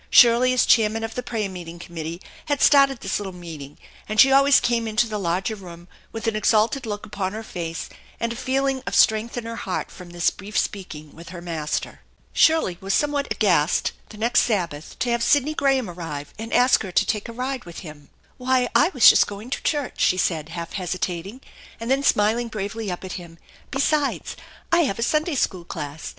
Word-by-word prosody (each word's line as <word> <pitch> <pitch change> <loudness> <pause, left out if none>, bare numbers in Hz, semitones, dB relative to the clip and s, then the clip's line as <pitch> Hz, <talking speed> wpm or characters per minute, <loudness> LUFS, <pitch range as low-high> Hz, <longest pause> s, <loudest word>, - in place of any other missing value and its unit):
Shirley 240 +1 +6
as 255 - +3
chairman 225 -1 +3
of 225 0 -4
the 250 - -3
prayer 225 -4 -3
meeting 175 -3 -8
committee 170 0 -7 0.2
had 290 -2 -1
started 275 -3 +5
this - - -2
little 200 -2 -5
meeting, 155 -5 -9 0.3
and 215 0 -1
she 270 +5 +8
always 275 +1 +6
came 235 -1 0
into 220 +2 +2
the 215 -1 -4
larger 185 +4 -1
room 175 -3 -12 0.2
with 225 0 -6
an 225 -1 0
exalted 220 +4 +2
look 205 -1 -4
upon 195 -2 -4
her 220 +1 -6
face 165 -5 -5 0.3
and 230 0 -1
a - - -9
feeling 265 +1 -1
of - - -2
strength 220 +1 +3
in 240 - -4
her 230 0 -5
heart 185 - -4
from 180 -2 -12
this 175 0 +1
brief 205 +3 -7
speaking 155 -7 -3
with 170 +1 -11
her 180 -1 -8
Master. 165 -3 -4 0.3
Shirley 315 - +3
was 195 0 0
somewhat 290 -1 0
aghast 175 -7 +2 0.2
the 215 - -12
next 230 +3 +2
Sabbath 170 -9 -2
to 245 - -1
have 235 0 0
Sidney 290 +4 +3
Graham 270 -5 +1
arrive 165 -5 -7
and 225 +1 -6
ask 250 +1 +4
her 190 - -6
to - - +2
take 210 +1 -2
a - - -7
ride 255 +2 -4
with 170 -1 -9
him. 150 -4 -12 0.3
"Why, 255 -1 +1
I - - +5
was 255 - +7
just - - +7
going 205 +5 -8
to 280 - -2
church," 290 -4 -2
she 185 - +3
said, 160 -4 -1
half 170 0 -6
hesi 185 -2 -3
tating, 185 +8 -4 0.4
and 230 +2 -3
then 270 +1 +3
smiling 225 -1 +2
bravely 215 0 -4
up 180 0 -5
at 185 - -6
him; 165 -1 -13 0.2
" - - -27
besides, 280 +1 0 0.4
I 340 - +5
have 195 - -2
a 230 - -1
Sunday 305 +4 0
school 185 -8 -1
class. 150 -3 -6
215 Hz, 210 wpm, -23 LUFS, 175-250 Hz, 0.4 s, she